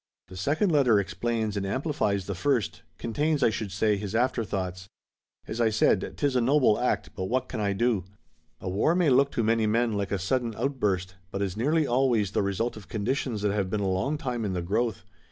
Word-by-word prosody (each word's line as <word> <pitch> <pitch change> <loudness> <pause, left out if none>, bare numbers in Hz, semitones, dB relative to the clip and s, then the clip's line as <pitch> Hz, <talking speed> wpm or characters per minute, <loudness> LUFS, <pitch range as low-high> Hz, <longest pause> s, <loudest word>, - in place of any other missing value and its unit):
"The 95 - -10
second 150 - +1
letter 130 -8 +4
explains 105 +3 -2
and 100 - -1
amplifies 105 - -1
the 100 - -3
first, 120 +3 0 0.2
contains, 145 +5 0
I 115 - +4
should 110 -2 -4
say, 105 +2 +1
his 100 +1 -5
afterthoughts. 95 -7 -1 0.6
As 115 +2 -3
I 115 - +4
said, 105 -3 +2
'tis 140 -3 0
a 125 - +3
noble 130 -3 +3
act, 125 - 0
but 95 -3 -4
what 130 +5 -1
can - - -5
I 100 -1 +1
do? 110 -3 +1 0.5
A - - -7
war 100 - +2
may 175 -6 +3
look 135 +2 +5
to 115 - 0
many 110 0 +2
men 115 +1 +1
like 100 -1 -2
a 100 - +1
sudden 115 +5 -1
outburst, 105 -8 -1
but 100 +2 -2
it - - +2
is 95 -1 -5
nearly 150 +8 +2
always 120 -6 +2
the - - +1
result 100 +4 -1
of 105 -3 -11
conditions 110 0 -2
that 105 - +2
have 100 -3 -1
been 105 - -1
a 100 - 0
long 95 +11 0
time 125 -6 -3
in 100 -3 -2
the 90 -1 -2
growth. 110 +4 -1
110 Hz, 215 wpm, -27 LUFS, 100-125 Hz, 0.6 s, look